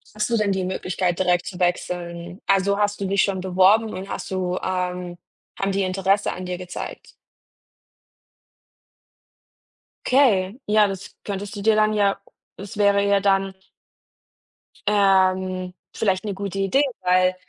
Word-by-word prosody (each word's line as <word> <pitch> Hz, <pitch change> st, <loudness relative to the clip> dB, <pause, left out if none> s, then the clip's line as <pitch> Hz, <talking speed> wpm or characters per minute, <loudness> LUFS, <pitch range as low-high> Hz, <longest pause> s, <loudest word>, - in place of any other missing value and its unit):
Hast 210 Hz, +1 st, -1 dB
du 235 Hz, -, +2 dB
denn 205 Hz, -2 st, +1 dB
die 190 Hz, -1 st, -1 dB
Möglichkeit 180 Hz, -1 st, -2 dB
direkt 180 Hz, -1 st, +2 dB
zu 180 Hz, -, -7 dB
wechseln? 175 Hz, 0 st, -2 dB
Also, 195 Hz, +1 st, +2 dB
hast 205 Hz, 0 st, 0 dB
du -, -, -1 dB
dich 195 Hz, 0 st, +2 dB
schon 190 Hz, -2 st, 0 dB
beworben 190 Hz, +4 st, +3 dB
und 185 Hz, +1 st, -6 dB
hast -, -, -6 dB
du 185 Hz, -1 st, -1 dB
ähm, 180 Hz, -1 st, -3 dB, 0.4 s
haben 195 Hz, 0 st, 0 dB
die 195 Hz, -, +1 dB
Interesse 195 Hz, +2 st, +1 dB
an 185 Hz, -, -6 dB
dir 180 Hz, 0 st, -4 dB
gezeigt? 180 Hz, 0 st, -8 dB, 2.9 s
Okay, 230 Hz, -5 st, +3 dB
ja, 210 Hz, 0 st, +4 dB
das 195 Hz, 0 st, -7 dB
könntest 200 Hz, +1 st, -5 dB
du 205 Hz, -, -5 dB
dir 220 Hz, 0 st, +4 dB
dann 215 Hz, 0 st, +3 dB
ja 200 Hz, -2 st, +1 dB, 0.4 s
es 200 Hz, +2 st, -9 dB
wäre 200 Hz, -1 st, +3 dB
ja 200 Hz, 0 st, +3 dB
dann 195 Hz, -1 st, +1 dB, 1.3 s
ähm, 185 Hz, -2 st, +2 dB, 0.2 s
vielleicht 190 Hz, -2 st, 0 dB
'ne 205 Hz, -, -2 dB
gute 195 Hz, 0 st, -5 dB
Idee, 195 Hz, +9 st, +2 dB, 0.2 s
weil 185 Hz, 0 st, +3 dB
195 Hz, 145 wpm, -23 LUFS, 185-200 Hz, 2.9 s, ja